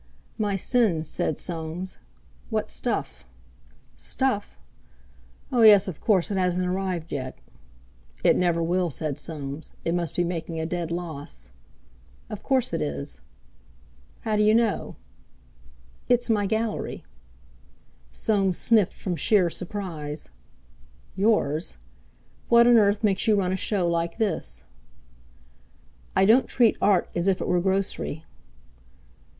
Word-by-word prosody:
"My 205 Hz, -2 st, 0 dB
sins," 195 Hz, -, +1 dB
said 155 Hz, -, -1 dB
Soames. 170 Hz, +2 st, -4 dB, 0.5 s
"What -, -, -2 dB
stuff!" 65 Hz, -1 st, -3 dB, 0.7 s
"Stuff? 250 Hz, -, -1 dB, 0.9 s
Oh, 245 Hz, -, +2 dB
yes—of 205 Hz, -6 st, +6 dB
course; 195 Hz, -3 st, +2 dB
it 200 Hz, -, -1 dB
hasn't 180 Hz, 0 st, +1 dB
arrived 180 Hz, -2 st, -2 dB
yet. 130 Hz, -2 st, -4 dB, 0.9 s
"It -, -, +5 dB
never 170 Hz, -2 st, +1 dB
will," 175 Hz, +1 st, +1 dB
said 150 Hz, -1 st, -3 dB
Soames; 145 Hz, -2 st, -6 dB
"it 165 Hz, -, +1 dB
must 170 Hz, -4 st, -2 dB
be 175 Hz, -, +2 dB
making 170 Hz, -1 st, -3 dB
a 160 Hz, -, -2 dB
dead 170 Hz, 0 st, -3 dB
loss." 160 Hz, -, -6 dB, 0.8 s
"Of 210 Hz, -, -6 dB
course 265 Hz, -3 st, +1 dB
it -, -, -1 dB
is." 70 Hz, -4 st, -3 dB, 1.0 s
"How 215 Hz, -1 st, 0 dB
d'you 210 Hz, +1 st, +4 dB
know?" 230 Hz, -3 st, 0 dB, 1.1 s
"It's 245 Hz, -1 st, +3 dB
my 205 Hz, -2 st, +2 dB
Gallery." 220 Hz, +1 st, -2 dB, 1.1 s
Soames 195 Hz, -, +1 dB
sniffed 220 Hz, -6 st, +3 dB
from 180 Hz, -3 st, -3 dB
sheer 185 Hz, -1 st, +3 dB
surprise. 165 Hz, -6 st, -5 dB, 0.9 s
"Yours? 190 Hz, -6 st, +1 dB, 0.7 s
What 235 Hz, 0 st, +7 dB
on 240 Hz, -1 st, +7 dB
earth 205 Hz, 0 st, +3 dB
makes 200 Hz, -1 st, +2 dB
you 215 Hz, -, +5 dB
run 190 Hz, -2 st, +1 dB
a -, -, +1 dB
show 190 Hz, -2 st, 0 dB
like 170 Hz, +2 st, -1 dB
this?" 195 Hz, -, -1 dB, 1.5 s
"I 190 Hz, -, +5 dB
don't 230 Hz, +6 st, +5 dB
treat 235 Hz, -3 st, +3 dB
Art 200 Hz, -4 st, +3 dB
as 175 Hz, +2 st, 0 dB
if 190 Hz, -1 st, +2 dB
it -, -, -3 dB
were 180 Hz, -1 st, +2 dB
grocery." 190 Hz, -4 st, -1 dB
185 Hz, 125 wpm, -25 LUFS, 165-210 Hz, 1.5 s, What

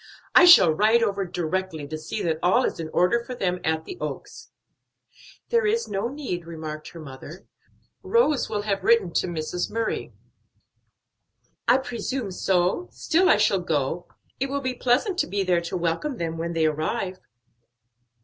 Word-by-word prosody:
"I 355 Hz, -, +8 dB
shall 195 Hz, -, +8 dB
ride 220 Hz, +7 st, +3 dB
over 200 Hz, -3 st, 0 dB
directly, 175 Hz, -2 st, -3 dB
to 155 Hz, -, -5 dB
see 205 Hz, +7 st, -5 dB
that 160 Hz, -2 st, -1 dB
all 185 Hz, +9 st, +3 dB
is -, -, -2 dB
in 160 Hz, -1 st, -4 dB
order 180 Hz, +9 st, +2 dB
for 250 Hz, +1 st, -7 dB
them 180 Hz, -5 st, -1 dB
at 160 Hz, 0 st, -1 dB
the 365 Hz, -, -8 dB
Oaks." -, -, -7 dB, 1.0 s
"There 465 Hz, -2 st, +2 dB
is 455 Hz, +2 st, 0 dB
no 195 Hz, +3 st, -2 dB
need," 240 Hz, -, -5 dB
remarked 155 Hz, -2 st, -7 dB
her 170 Hz, -, -11 dB
mother. 150 Hz, +3 st, -10 dB, 0.6 s
"Rose 310 Hz, -, +2 dB
will 210 Hz, -1 st, -2 dB
have 200 Hz, -2 st, -2 dB
written 210 Hz, -7 st, +3 dB
to -, -, +1 dB
Mrs. 175 Hz, +1 st, -3 dB
Murray." 225 Hz, 0 st, -3 dB, 1.6 s
"I -, -, +6 dB
presume 245 Hz, -3 st, -4 dB
so, 185 Hz, -, 0 dB
still 365 Hz, +4 st, +2 dB
I -, -, +6 dB
shall 210 Hz, -2 st, +3 dB
go; 160 Hz, 0 st, -2 dB, 0.3 s
it 270 Hz, +1 st, -1 dB
will 280 Hz, +1 st, -2 dB
be 260 Hz, -1 st, -2 dB
pleasant 255 Hz, -, +1 dB
to -, -, +1 dB
be 200 Hz, 0 st, -1 dB
there 180 Hz, -2 st, +2 dB
to 170 Hz, +2 st, -4 dB
welcome 175 Hz, -, -2 dB
them 165 Hz, -3 st, -3 dB
when 170 Hz, +1 st, -3 dB
they 165 Hz, -1 st, +1 dB
arrive." 155 Hz, +4 st, -2 dB
190 Hz, 170 wpm, -25 LUFS, 165-245 Hz, 1.6 s, I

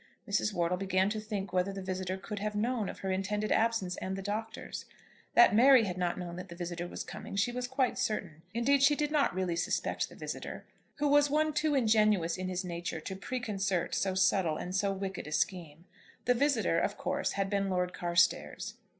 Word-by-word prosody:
Mrs. 210 Hz, +1 st, +1 dB
Wortle 180 Hz, -1 st, 0 dB
began 190 Hz, +1 st, +1 dB
to 215 Hz, -, -2 dB
think 210 Hz, -3 st, -4 dB
whether 185 Hz, +1 st, +1 dB
the 195 Hz, -, -6 dB
visitor 185 Hz, 0 st, -3 dB
could 205 Hz, +2 st, -6 dB
have 210 Hz, +1 st, -3 dB
known 225 Hz, -1 st, 0 dB
of -, -, -8 dB
her 190 Hz, -, -2 dB
intended 205 Hz, +3 st, -1 dB
absence 220 Hz, -6 st, +1 dB
and 190 Hz, 0 st, -3 dB
the 195 Hz, -, -5 dB
Doctor's. 220 Hz, +2 st, -4 dB, 0.5 s
That 240 Hz, -, +7 dB
Mary 255 Hz, +2 st, +7 dB
had 185 Hz, -4 st, -2 dB
not 175 Hz, -1 st, -1 dB
known 175 Hz, -1 st, -6 dB
that 180 Hz, +1 st, -7 dB
the 170 Hz, -, -8 dB
visitor 175 Hz, 0 st, -4 dB
was -, -, -5 dB
coming -, -, -8 dB
she 210 Hz, +5 st, +1 dB
was 250 Hz, 0 st, -3 dB
quite 260 Hz, -1 st, 0 dB
certain. 175 Hz, -7 st, -2 dB
Indeed 260 Hz, +5 st, +2 dB
she 285 Hz, +1 st, +6 dB
did 295 Hz, 0 st, -1 dB
not 290 Hz, -, +2 dB
really 185 Hz, -2 st, 0 dB
suspect 170 Hz, -, -1 dB
the -, -, -13 dB
visitor, -, -, -6 dB, 0.3 s
who 290 Hz, -, 0 dB
was 290 Hz, 0 st, +5 dB
one 310 Hz, +1 st, +2 dB
too 300 Hz, 0 st, +1 dB
ingenuous 215 Hz, -8 st, +3 dB
in 185 Hz, 0 st, -4 dB
his 185 Hz, 0 st, -3 dB
nature 170 Hz, -2 st, -4 dB
to 190 Hz, +5 st, -6 dB
preconcert 195 Hz, -4 st, -2 dB
so 190 Hz, -1 st, 0 dB
subtle 190 Hz, -4 st, +2 dB
and 180 Hz, +1 st, -5 dB
so 200 Hz, 0 st, +2 dB
wicked 195 Hz, -3 st, -4 dB
a -, -, -7 dB
scheme. 170 Hz, -1 st, -2 dB, 0.4 s
The 245 Hz, -, +4 dB
visitor, 235 Hz, -, +2 dB
of 205 Hz, -, -1 dB
course, -, -, -1 dB
had 195 Hz, 0 st, 0 dB
been 200 Hz, 0 st, 0 dB
Lord 180 Hz, -1 st, 0 dB
Carstairs. 175 Hz, +3 st, +1 dB
195 Hz, 205 wpm, -31 LUFS, 180-225 Hz, 0.5 s, That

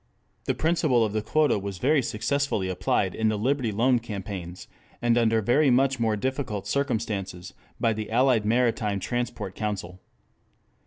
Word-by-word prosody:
The 130 Hz, -, 0 dB
principle 155 Hz, -5 st, +2 dB
of 105 Hz, -, -4 dB
the 110 Hz, -, 0 dB
quota 150 Hz, +1 st, +2 dB
was 100 Hz, -1 st, -5 dB
very 140 Hz, -, +3 dB
successfully 115 Hz, -3 st, -1 dB
applied 95 Hz, +1 st, 0 dB
in 110 Hz, 0 st, +1 dB
the 110 Hz, -, -1 dB
Liberty 125 Hz, +1 st, 0 dB
Loan 120 Hz, +4 st, +2 dB
Campaigns, 95 Hz, -5 st, -7 dB, 0.3 s
and 120 Hz, -1 st, +2 dB
under 115 Hz, -2 st, +2 dB
very 135 Hz, +7 st, +3 dB
much 135 Hz, +1 st, +3 dB
more 110 Hz, -2 st, +1 dB
difficult 125 Hz, -3 st, -3 dB
circumstances 100 Hz, -9 st, -2 dB, 0.3 s
by 115 Hz, -, +2 dB
the 110 Hz, 0 st, -5 dB
Allied 120 Hz, -1 st, +3 dB
Maritime 110 Hz, -3 st, +1 dB
Transport 120 Hz, -3 st, -3 dB
Council. 100 Hz, -4 st, -4 dB
110 Hz, 150 wpm, -26 LUFS, 100-130 Hz, 0.3 s, very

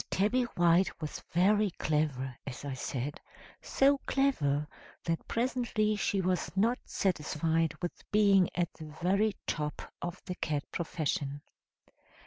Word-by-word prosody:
Tabby 235 Hz, +6 st, +2 dB
White 175 Hz, +2 st, +4 dB
was 155 Hz, -2 st, -5 dB
very 205 Hz, +4 st, +4 dB
clever, 140 Hz, -4 st, 0 dB
as 135 Hz, +1 st, -6 dB
I 140 Hz, -, -3 dB
said 135 Hz, +1 st, -4 dB, 0.4 s
so 275 Hz, +1 st, +3 dB
clever 150 Hz, -, +2 dB, 0.4 s
that 165 Hz, -1 st, -2 dB
presently 230 Hz, -3 st, +1 dB
she 200 Hz, -1 st, 0 dB
was 180 Hz, -1 st, 0 dB
not 230 Hz, +5 st, +3 dB
satisfied 165 Hz, -2 st, 0 dB
with 175 Hz, -, -4 dB
being 200 Hz, -3 st, +5 dB
at 175 Hz, -1 st, 0 dB
the 155 Hz, -, -9 dB, 0.2 s
very 200 Hz, +3 st, +3 dB
top 150 Hz, -1 st, -3 dB
of 175 Hz, +2 st, -4 dB
the 180 Hz, -, -3 dB
cat 150 Hz, -5 st, -2 dB
profession. 145 Hz, -4 st, -2 dB
175 Hz, 125 wpm, -31 LUFS, 150-205 Hz, 0.4 s, being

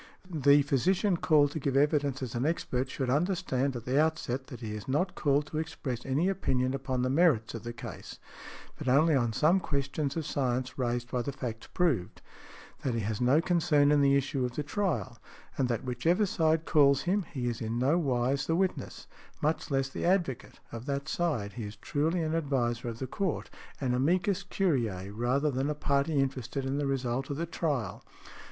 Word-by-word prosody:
The 145 Hz, -2 st, +5 dB
physician 175 Hz, -, +2 dB
called 150 Hz, -4 st, +3 dB
to 155 Hz, -, -4 dB
give 135 Hz, -1 st, 0 dB
evidence 145 Hz, -2 st, +2 dB
as 120 Hz, -, -5 dB
an 120 Hz, -, -1 dB
expert 135 Hz, -4 st, -1 dB
should 130 Hz, -2 st, -2 dB
understand 145 Hz, -4 st, 0 dB
at 120 Hz, -, -6 dB
the 135 Hz, +4 st, +3 dB
outset 145 Hz, -5 st, -1 dB
that 125 Hz, -4 st, -9 dB
he 110 Hz, -2 st, -4 dB
is 105 Hz, -1 st, -7 dB
not 175 Hz, +8 st, 0 dB
called 145 Hz, -3 st, +1 dB
to 155 Hz, 0 st, -4 dB
express 135 Hz, -7 st, -4 dB
any 145 Hz, +7 st, +1 dB
opinion 130 Hz, -9 st, 0 dB
upon 130 Hz, -2 st, -2 dB
the 130 Hz, -, +1 dB
merits 135 Hz, -8 st, +3 dB
of 115 Hz, -, -5 dB
the 120 Hz, -, -4 dB
case, 120 Hz, -, -9 dB, 0.6 s
but -, -, -6 dB
only 155 Hz, +5 st, +4 dB
on 120 Hz, -4 st, +2 dB
some 155 Hz, -, +3 dB
questions 140 Hz, -2 st, -2 dB
of 160 Hz, -, -2 dB
science 130 Hz, -3 st, -1 dB
raised 120 Hz, -1 st, -2 dB
by 125 Hz, -, 0 dB
the 140 Hz, -, -3 dB
facts 120 Hz, -4 st, -6 dB
proved; 155 Hz, -, -1 dB, 0.6 s
that 125 Hz, -4 st, -1 dB
he 115 Hz, -, 0 dB
has 105 Hz, +2 st, -3 dB
no 130 Hz, +6 st, +4 dB
concern 160 Hz, -5 st, +3 dB
in 145 Hz, -1 st, +4 dB
the 140 Hz, 0 st, +4 dB
issue 135 Hz, -1 st, 0 dB
of 125 Hz, -1 st, -3 dB
the 150 Hz, -, -2 dB
trial, 150 Hz, -, -2 dB, 0.4 s
and 135 Hz, -, +1 dB
that 120 Hz, +2 st, -1 dB
whichever 130 Hz, -, +1 dB
side 160 Hz, -3 st, +1 dB
calls 140 Hz, -4 st, +4 dB
him 195 Hz, +3 st, +1 dB
he 130 Hz, -5 st, -3 dB
is 120 Hz, -2 st, -3 dB
in 115 Hz, +1 st, -2 dB
no 140 Hz, +8 st, +3 dB
wise 135 Hz, -1 st, 0 dB
the 165 Hz, -, +2 dB
witness—much 170 Hz, -3 st, -3 dB
less 135 Hz, -1 st, +1 dB
the 135 Hz, -, -6 dB
advocate—of 135 Hz, -8 st, -2 dB
that 140 Hz, 0 st, -2 dB
side. 135 Hz, -13 st, -1 dB
He 115 Hz, -3 st, -5 dB
is 105 Hz, +1 st, -8 dB
truly 160 Hz, +4 st, -1 dB
an 155 Hz, 0 st, -1 dB
adviser 130 Hz, -7 st, 0 dB
of 115 Hz, -, -6 dB
the 130 Hz, -, -4 dB
Court, 185 Hz, -, -3 dB, 0.3 s
an 130 Hz, -3 st, 0 dB
amicus 180 Hz, +9 st, +1 dB
curiæ, 115 Hz, -, -1 dB
rather 130 Hz, +7 st, +1 dB
than 135 Hz, +2 st, -1 dB
a 150 Hz, -, -1 dB
party 140 Hz, +1 st, +1 dB
interested 135 Hz, 0 st, -2 dB
in 135 Hz, +2 st, -1 dB
the 145 Hz, -, 0 dB
result 130 Hz, -1 st, -1 dB
of 140 Hz, -, -3 dB
the 165 Hz, -, -1 dB
trial. 150 Hz, -7 st, -2 dB
140 Hz, 195 wpm, -30 LUFS, 125-155 Hz, 0.6 s, The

